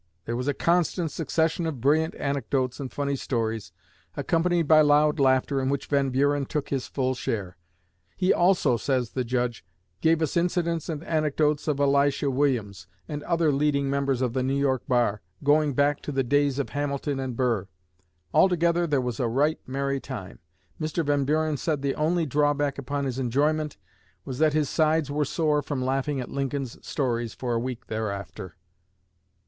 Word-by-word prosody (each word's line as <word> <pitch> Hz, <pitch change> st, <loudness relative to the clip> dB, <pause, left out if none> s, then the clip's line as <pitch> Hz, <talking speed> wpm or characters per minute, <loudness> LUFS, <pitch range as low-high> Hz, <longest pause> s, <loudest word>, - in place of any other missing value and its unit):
There 115 Hz, -, -2 dB
was 125 Hz, +3 st, -3 dB
a 145 Hz, -, +1 dB
constant 170 Hz, -1 st, +1 dB
succession 165 Hz, +1 st, 0 dB
of 150 Hz, -6 st, -4 dB
brilliant 155 Hz, +6 st, +2 dB
anecdotes 135 Hz, -2 st, -1 dB
and 135 Hz, -3 st, -5 dB
funny 140 Hz, -1 st, -1 dB
stories, 115 Hz, -8 st, -2 dB, 0.5 s
accompanied 170 Hz, -1 st, +1 dB
by 155 Hz, 0 st, +7 dB
loud 150 Hz, +1 st, +4 dB
laughter 135 Hz, 0 st, +2 dB
in 130 Hz, -, 0 dB
which 140 Hz, -1 st, -1 dB
Van 140 Hz, -2 st, +1 dB
Buren 140 Hz, +1 st, +1 dB
took 150 Hz, -2 st, -3 dB
his 135 Hz, -2 st, -2 dB
full 130 Hz, -1 st, -1 dB
share. 100 Hz, -7 st, -3 dB, 0.6 s
"He 185 Hz, 0 st, +3 dB
also," 175 Hz, -9 st, +3 dB
says 125 Hz, -1 st, -1 dB
the 130 Hz, -, -1 dB
Judge, 120 Hz, -1 st, -2 dB, 0.4 s
"gave 160 Hz, 0 st, +3 dB
us 155 Hz, -, -2 dB
incidents 170 Hz, -2 st, 0 dB
and 155 Hz, -1 st, -4 dB
anecdotes 150 Hz, -2 st, 0 dB
of 145 Hz, -2 st, 0 dB
Elisha 140 Hz, 0 st, +2 dB
Williams, 120 Hz, -9 st, -1 dB, 0.2 s
and 150 Hz, -2 st, -4 dB
other 165 Hz, -3 st, +2 dB
leading 140 Hz, -1 st, +1 dB
members 140 Hz, -2 st, 0 dB
of 125 Hz, -2 st, -1 dB
the 130 Hz, -, 0 dB
New 135 Hz, +2 st, 0 dB
York 135 Hz, -3 st, +1 dB
bar, 120 Hz, -5 st, +1 dB, 0.2 s
going 145 Hz, 0 st, +3 dB
back 145 Hz, +1 st, +2 dB
to -, -, -5 dB
the 135 Hz, -1 st, +1 dB
days 140 Hz, +1 st, +2 dB
of 140 Hz, -, -2 dB
Hamilton 145 Hz, -1 st, -2 dB
and 130 Hz, -2 st, -3 dB
Burr. 115 Hz, -7 st, 0 dB, 0.7 s
Altogether 175 Hz, -1 st, +3 dB
there 145 Hz, -3 st, +2 dB
was 125 Hz, 0 st, -3 dB
a 125 Hz, -, +1 dB
right 145 Hz, +7 st, +1 dB
merry 140 Hz, +1 st, -1 dB
time. 115 Hz, -10 st, -8 dB, 0.4 s
Mr. 155 Hz, +1 st, -1 dB
Van 145 Hz, -1 st, +1 dB
Buren 155 Hz, +1 st, +1 dB
said 150 Hz, -1 st, -2 dB
the 140 Hz, -1 st, +1 dB
only 165 Hz, +2 st, +1 dB
drawback 145 Hz, 0 st, +1 dB
upon 140 Hz, +1 st, -3 dB
his 130 Hz, -1 st, -3 dB
enjoyment 150 Hz, +4 st, 0 dB, 0.5 s
was 130 Hz, -1 st, -5 dB
that 155 Hz, -1 st, +4 dB
his 150 Hz, -2 st, +1 dB
sides 155 Hz, -1 st, +1 dB
were 150 Hz, +1 st, 0 dB
sore 150 Hz, 0 st, +1 dB
from 135 Hz, -3 st, -3 dB
laughing 135 Hz, +2 st, -1 dB
at 125 Hz, -, -6 dB
Lincoln's 135 Hz, -2 st, -3 dB
stories 120 Hz, -4 st, -2 dB
for 125 Hz, -2 st, -2 dB
a 115 Hz, -, +1 dB
week 125 Hz, 0 st, -5 dB
thereafter." 100 Hz, -4 st, -5 dB
140 Hz, 175 wpm, -26 LUFS, 130-150 Hz, 0.7 s, by